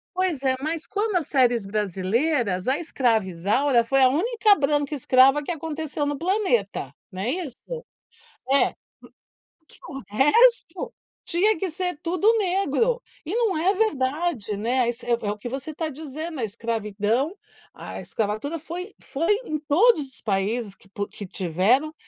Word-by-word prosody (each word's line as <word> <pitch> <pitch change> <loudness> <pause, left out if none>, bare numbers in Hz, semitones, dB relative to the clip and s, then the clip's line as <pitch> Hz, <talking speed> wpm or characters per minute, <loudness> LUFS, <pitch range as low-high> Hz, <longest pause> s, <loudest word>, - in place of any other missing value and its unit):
Pois 365 -7 0
é, 260 -1 +2
mas 320 +1 -2
quando 415 -2 0
as 320 - -2
séries 245 -6 +2
brasileiras, 205 - 0
a 275 - +1
escrava 245 - +1
Isaura 230 +9 +2
foi 270 +4 +2
a 260 - +8
única 420 - +3
branca 290 0 0
escrava 270 +2 +5
que 320 - -3
aconteceu 315 -2 -3
no 290 0 -2
planeta, 250 - 0 0.2
né, 190 +6 -2
isso? 315 -6 -4 1.0
É, 280 - +5
hum, - - -11 1.0
que - - -17
o 270 -1 -6
resto, 385 - +3 0.3
tinha 405 +5 +2
que 370 +2 -2
ser 360 -1 -3
tudo 365 +6 +3
negro, 395 - +1 0.2
e 355 +9 -3
num 450 -7 +1
é 360 +5 +2
verdade, 295 - 0
né, 235 +6 0
ai 240 - 0
se, 240 - -8
é 240 - -2
é 230 -3 0
o 210 - -2
que 240 +4 -6
você 275 +4 -5
tá 315 +1 -3
dizendo, 310 +2 -6
a 230 - 0
escravidão, 225 - -1 0.4
a - - -8
escravatura 220 +9 -2
foi 355 +5 -7
foi 330 +9 0
em 305 -6 -2
todos 310 - +3
os 265 - -11
países 205 +1 -1
que 195 - -21
pu 200 +1 -4
que 205 - -8
tiveram, 195 - +1
280 Hz, 160 wpm, -24 LUFS, 230-345 Hz, 1.0 s, a